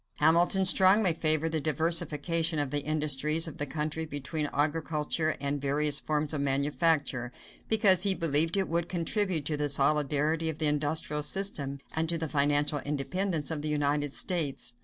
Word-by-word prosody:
Hamilton 175 +4 +3
strongly 190 0 +6
favored 155 0 +1
the 160 -1 -2
diversification 160 +1 0
of 145 -3 -2
the 145 - -1
industries 155 +2 +1
of 160 - -10
the 145 - -3
country 155 +2 -4
between 150 0 -5
agriculture 155 +1 -1
and 140 0 -3
various 145 +1 +1
forms 150 0 -3
of 145 - -3
manufacture, 140 -2 -1 0.4
because 200 -5 +5
he 195 -1 +2
believed 165 +2 +1
it 195 - -1
would 170 +1 -3
contribute 180 -2 -1
to 150 - -2
the 145 0 -2
solidity 150 +3 0
of 155 - -6
the 160 - -1
industrial 150 0 -2
system 150 -4 -1 0.2
and 160 0 -1
to 170 - -1
the 160 0 -4
financial 145 0 0
independence 150 +4 -3
of 155 -2 -4
the 155 - -4
United 145 -1 -2
States. 145 -9 -1
155 Hz, 160 wpm, -28 LUFS, 145-165 Hz, 0.4 s, strongly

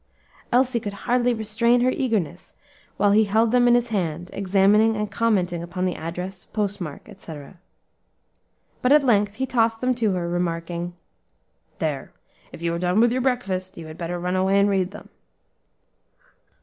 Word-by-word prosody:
Elsie 250 0 +3
could 205 -2 -5
hardly 245 0 +2
restrain 235 +2 +1
her 255 +1 +3
eagerness 200 - -2 0.4
while 200 0 +3
he 215 +1 +5
held 220 +2 +2
them 245 0 +4
in 240 - +6
his 240 0 +1
hand, 175 -4 -2
examining 200 +3 +3
and 210 -1 -3
commenting 190 -7 0
upon 175 +2 -3
the 180 - 0
address, 180 +4 -6
postmark, 200 -7 -4
etc. 170 -5 -11 1.2
But 250 - +2
at 300 -1 +6
length 205 -4 +2
he 265 - -1
tossed 225 -3 +1
them 255 +1 +1
to 225 -5 0
her, 175 -2 -2
remarking, 175 0 -3 0.8
"There! - - -3 0.4
if 170 - -10
you 170 0 0
are 170 - -2
done 195 +7 +3
your 255 +1 0
breakfast, 200 -8 -2
you 165 - -8
had 155 +1 -10
better 175 +1 -3
run 180 +1 -2
away 190 +1 +3
and 200 - +4
read 190 -2 +1
them." 205 - -12
200 Hz, 160 wpm, -23 LUFS, 175-230 Hz, 1.2 s, in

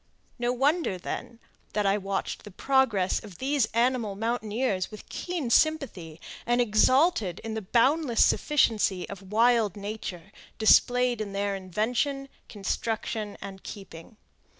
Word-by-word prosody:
No 240 0 +1
wonder 275 - +1
then, 230 +5 -6 0.3
that 210 -1 0
I 195 0 +3
watched 195 -1 -3
the 210 - -10
progress 215 -3 +1
of 200 -5 -11
these 270 -2 +1
animal 235 -3 0
mountaineers 220 -2 -1
with 215 - -11
keen 340 -9 -4
sympathy, 230 - +1 0.2
and 240 +1 +1
exulted 240 - +3
in 225 -1 -4
the 220 - -3
boundless 245 - +3
sufficiency 215 -10 +1
of 195 -1 -10
wild 225 -2 +3
nature 200 -3 -6 0.3
displayed 245 +1 +4
in 200 -2 -5
their 200 0 -1
invention, 240 +9 -2 0.2
construction, 215 +1 -3
and 190 -1 -8
keeping. 195 +1 -10
220 Hz, 125 wpm, -27 LUFS, 200-250 Hz, 0.3 s, displayed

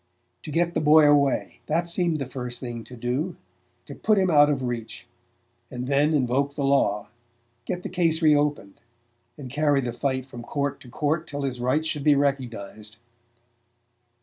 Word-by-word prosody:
To - - -9
get 170 +3 0
the - - 0
boy 150 0 +6
away 140 -2 +2
that 170 +3 0
seemed 170 -2 +1
the 140 - -3
first 125 -1 -6
thing 120 -2 -6
to 125 - -11
do: 130 +9 -2 0.5
to - - -9
put 215 -1 +1
him 190 -2 +2
out 145 -1 +6
of 135 -3 -1
reach, 120 -2 -5 0.6
and 125 -1 -5
then 145 +3 +2
invoke 140 +1 0
the 140 - -1
law, 120 -7 +1 0.6
get 180 0 -4
the - - -3
case 165 -3 +1
re 155 -3 +5
opened, 145 -9 -1 0.6
and 140 -3 -8
carry 145 0 +2
the 120 -3 -3
fight 130 0 -2
from 120 -3 -10
court 140 +3 -3
to 125 - -13
court 155 +5 -1
till 145 -1 -5
his 130 -2 -3
rights 130 +6 +1
should 150 -2 -2
be 150 0 +5
recognized. 115 -6 -3
140 Hz, 175 wpm, -25 LUFS, 125-155 Hz, 0.6 s, boy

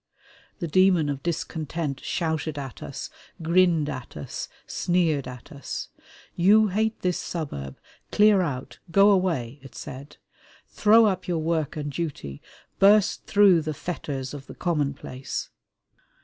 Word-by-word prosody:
The 175 - -3
demon 180 -2 +4
of 140 -1 -3
discontent 160 -3 -3
shouted 160 -3 -2
at 135 -4 -7
us, - - -6 0.3
grinned 170 -2 +3
at 130 - -6
us, 75 - -6 0.2
sneered 165 -6 0
at 125 -1 -10
us. 140 -1 -6 0.4
"You 210 +4 +5
hate 220 +3 -1
this 180 -1 0
suburb: 70 - -5 0.3
clear 210 -2 +5
out, 135 -7 -4
go 195 +4 +6
away!" 160 -10 0
it 135 -2 -13
said. 135 +3 -9 0.5
"Throw 220 +2 +5
up 185 -3 0
your 175 -2 0
work 160 -2 -1
and 145 -1 -3
duty. 140 - -5 0.4
Burst 205 +1 +4
through 200 -5 +5
the 155 -1 -4
fetters 140 -6 -5
of 140 -2 -9
the - - -10
commonplace!" 140 -5 -3
160 Hz, 135 wpm, -25 LUFS, 140-185 Hz, 0.5 s, go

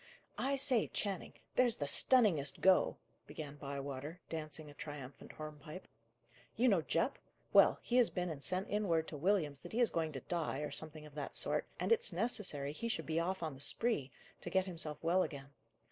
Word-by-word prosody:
"I 275 +1 +1
say, 265 -4 +5
Channing, 195 -4 -3 0.2
there's 245 -2 +4
the 145 - -2
stunningest 175 - +4
go!" 190 -1 +4 0.3
began 145 -2 -7
Bywater, 140 +3 -5
dancing 155 -1 -5
a 145 - -11
triumphant 145 -3 -9
hornpipe. 155 +3 -9 0.7
"You 250 +2 +4
know 195 -6 +4
Jupp? - - 0 0.3
Well, - - +7
he 245 - +1
has 245 - +6
been 180 -1 -2
and 145 -3 -7
sent 185 +2 0
in 210 0 -1
word 160 -2 +1
to - - -7
Williams 155 -4 +1
that - - -10
he 235 - 0
is 240 - +4
going 160 -2 -1
to 135 - -5
die, 160 -4 -2
or 150 - -3
something 155 -1 -6
of 150 - -13
that 145 -1 -5
sort, - - 0
and - - -1
it's 455 - +3
necessary 175 - 0
he 230 +9 -4
should 230 - -2
be 160 +1 0
off 185 +2 -2
on 155 -3 -2
the 135 - -12
spree, 185 - 0 0.3
to - - -5
get 190 -1 +2
himself 165 -5 -2
well 175 +3 +3
again. 140 -5 -4
160 Hz, 195 wpm, -36 LUFS, 145-200 Hz, 0.7 s, Well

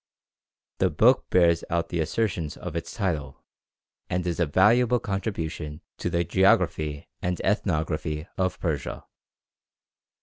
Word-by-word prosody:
The - - +3
book - - +3
bears 85 -2 +4
out 85 -1 0
the 85 - -2
assertions 85 -1 -1
of 90 -2 -7
its 85 0 -4
title, 80 -10 -3 0.7
and 90 0 -1
is 85 -1 -2
a 85 - +2
valuable 115 +9 +4
contribution 85 -8 -4 0.2
to - - -1
the 85 0 +1
geography 85 -5 +2
and 90 0 -1
ethnography 80 -5 -1
of 95 0 -1
Persia. 80 -6 -3
85 Hz, 125 wpm, -26 LUFS, 80-95 Hz, 0.7 s, bears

